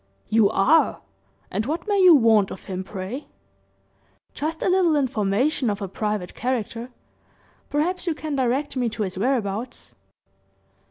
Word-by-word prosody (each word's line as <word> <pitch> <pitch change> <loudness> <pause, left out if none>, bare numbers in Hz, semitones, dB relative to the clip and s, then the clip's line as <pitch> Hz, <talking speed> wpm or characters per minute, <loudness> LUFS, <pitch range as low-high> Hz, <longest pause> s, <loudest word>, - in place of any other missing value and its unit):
"You 215 -2 +4
are! 270 +9 +3 0.5
And 210 +5 -2
what 320 +7 -3
may 405 -2 +2
you 360 -3 +8
want 225 -6 +4
of - - -9
him, 190 -1 -5
pray?" 195 +9 -6 1.1
"Just 320 +2 -3
a - - +1
little 365 -4 +3
information 255 0 +1
of 205 -1 -2
a 200 - -4
private 210 -1 -3
character 240 -1 -3 0.8
perhaps 345 +5 -1
you 330 - 0
can 305 -1 -4
direct 265 +2 0
me 250 -2 0
to 220 -1 -3
his 190 -2 -4
whereabouts." 225 +1 -2
245 Hz, 145 wpm, -23 LUFS, 210-300 Hz, 1.1 s, you